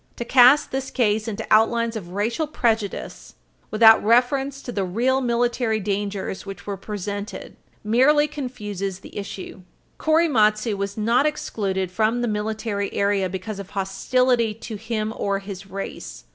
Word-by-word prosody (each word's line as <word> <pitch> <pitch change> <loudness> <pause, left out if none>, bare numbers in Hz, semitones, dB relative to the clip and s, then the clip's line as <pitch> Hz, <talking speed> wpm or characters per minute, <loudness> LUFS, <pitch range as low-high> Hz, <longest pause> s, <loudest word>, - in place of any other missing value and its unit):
To 235 - -5
cast 260 +4 +6
this 265 0 -3
case 220 -3 +1
into 215 -3 -4
outlines 230 +1 +3
of 190 -6 -6
racial 225 - -1
prejudice, 225 -8 -2 0.3
without 220 0 +6
reference 265 +5 +2
to 245 - -5
the 200 -4 -1
real 245 +9 +1
military 240 -2 0
dangers 200 -1 -3
which 195 -3 -9
were 200 - -3
presented, 205 +1 -6 0.3
merely 265 +7 +4
confuses 210 -10 -5
the - - -13
issue. 195 -2 -7 0.4
Korematsu 230 -10 +2
was 200 +1 -4
not 235 +7 +3
excluded 195 -10 -2
from 220 +5 +1
the - - 0
Military 210 -1 -2
Area 200 -2 +1
because 190 +3 -5
of 200 -1 -8
hostility 230 +4 +1
to 225 0 -8
him 220 0 -3
or 200 -1 -1
his 195 0 -8
race. 190 - -7
215 Hz, 145 wpm, -23 LUFS, 200-245 Hz, 0.4 s, cast